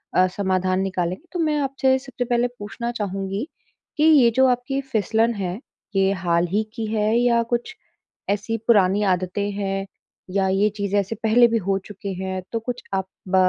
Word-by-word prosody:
अ, 185 - +5
समाधान 185 -1 0
निकालेंगे। 185 - -2
तो 355 - -4
मैं 310 -2 +1
आपसे 265 -1 +2
सबसे 260 -2 -5
पहले 240 0 +2
पूछना 235 +3 -4
चाहूँगी, 195 +1 -3 0.5
कि 300 - +2
ये 290 -7 +7
जो 265 0 +5
आपकी 250 +2 0
फिसलन 225 +1 +2
है, 190 -1 -3 0.4
ये 195 0 +3
हाल 175 -2 +1
ही 210 +2 +2
की 225 -2 -3
है 215 +1 +2
या 240 -1 +3
कुछ 240 - -1 0.5
ऐसी 210 +3 -1
पुरानी 205 -2 +4
आदतें 185 +3 -2
हैं 195 -1 -2 0.5
या 195 -1 +2
ये 195 +3 +3
चीज़ें 200 0 +1
ऐसे 200 +3 -2
पहले 235 +2 +6
भी 230 0 +1
हो 195 -2 0
चुकी 200 -1 -6
हैं? 190 0 -3
तो 230 - -1
कुछ 245 +2 -5
आप 190 -1 -1 0.2
ब 185 - 0
210 Hz, 180 wpm, -23 LUFS, 190-240 Hz, 0.5 s, ये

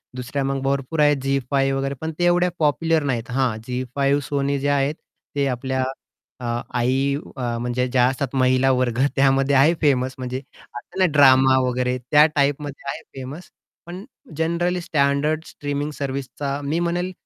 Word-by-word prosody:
दुसऱ्या 130 +2 -3
मग 135 0 -1
भरपूर 140 +3 -1
आहेत 145 -1 +4
झी 135 0 +1
5 135 -1 +1
वगैरे, 135 0 -2
पण 160 0 -3
ते - - +1
एवढ्या 175 +1 +3
पॉप्युलर 160 +1 +2
नाहीत. 120 -5 -2
हा 130 -3 +1
झी 125 0 -2
5 140 +1 +2
Sony 140 0 0
जे 140 - -2
आहेत 140 +1 +1 0.4
ते 140 -1 +1
आपल्या 130 +1 -2 0.6
अ, 125 - -7 0.3
आई 135 +3 +1 0.2
म्हणजे 120 +1 -1
ज्या 125 -1 +3
असतात, 130 +1 -2
महिला 130 0 +3
वर्ग 125 -2 0 0.2
त्यामध्ये 135 0 +3
आहे 145 +5 +5
फेमस 130 -3 +2
म्हणजे 130 0 -4 0.4
असते 120 +9 -8
ना 185 - +5
ड्रामा 135 -2 +6
वगैरे 125 0 0
त्या 150 0 +7
टाइपमध्ये 140 -1 -1
आहे - - -7
फेमस. 135 +7 -8 0.4
पण 180 +3 -8 0.3
जनरली 170 +2 0
स्टँडर्ड 150 +1 +1
स्ट्रीमिंग 145 +1 -4
सर्व्हिसचा 140 0 -4
मी 150 +4 -1
म्हणेल, 175 +1 -1
140 Hz, 160 wpm, -22 LUFS, 130-150 Hz, 0.6 s, त्या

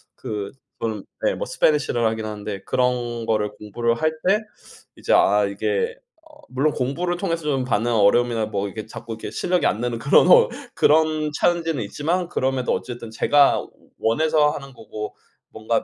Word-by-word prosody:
그 105 -2 -5 0.3
저는 110 -3 -3 0.2
네 - - +2
뭐 - - -4
스패니시를 140 -6 +1
하긴 110 0 -2
하는데 105 -2 -5
그런 120 -2 -1
거를 105 -2 0
공부를 115 +3 -1
할 155 - +2 0.2
때 210 +3 +4 0.6
이제 - - -3
아 105 +1 +4
이게 465 - -1 0.3
어 305 -2 -19
물론 140 +4 +1
공부를 175 +8 -2
통해서 170 -4 -2
좀 135 -3 0
받는 120 0 0
어려움이나 115 +2 +3
뭐 100 -2 -2
이게 110 +2 -7
자꾸 115 +1 -9
이렇게 110 - -7
실력이 180 -3 0
안 105 - 0
느는 120 -1 -2
그런 - - +5 0.5
그런 155 0 +3
찬지는 165 -4 0
있지만 165 - -2
그럼에도 130 -1 -1
어쨌든 120 -2 -5
제가 140 +5 +4
워 - - -8 0.3
원해서 150 +5 +2
하는 135 -3 -8
거고 110 -2 -7 0.4
뭔가 110 +1 -1
120 Hz, 335 characters per minute, -22 LUFS, 110-155 Hz, 0.6 s, 그런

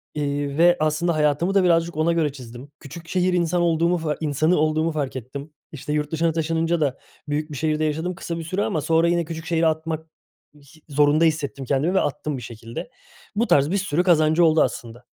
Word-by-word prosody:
eee, 145 -1 -2
ve, 175 +1 +5
aslında, 155 +3 +1
hayatımı 150 +4 +1
da 195 -1 +4
birazcık 170 -2 +2
ona 160 +2 +2
göre 160 -4 +1
çizdim. 125 +1 -11
Küçük 165 +4 -11
şehir 185 0 +1
insan 175 0 +1
olduğumu, 170 +1 +2
fa 155 -3 -2
insanı 155 +3 +1
olduğumu 155 +1 +1
fark 145 -4 -3
ettim. 140 +4 -8 0.2
İşte, 150 0 -5
yurt 150 -1 -1
dışına 165 +1 +1
taşınınca 165 +1 0
da 140 -3 0 0.3
büyük 150 +1 -2
bir 145 - -6
şehirde 155 +1 0
yaşadım 160 +4 -2
kısa 170 0 -5
bir 165 - -5
süre 185 +5 -2
ama 155 - -1
sonra 165 +3 +2
yine 170 0 +1
küçük 160 0 -7
şehri 165 0 +1
atmak, 160 0 -2 0.5
hi 150 +2 -20
zorunda 145 +2 +3
hissettim 150 -4 -1
kendimi 140 +7 0
ve 190 - +3
attım 145 0 -3
bir - - -7
şekilde. 115 - -8 0.5
Bu 230 +3 +1
tarz 145 +3 +3
bir 200 - +1
sürü 180 -3 0
kazancı 165 -1 +4
oldu, 160 -1 +4
aslında. 120 -1 -5
155 Hz, 200 wpm, -23 LUFS, 145-170 Hz, 0.5 s, ve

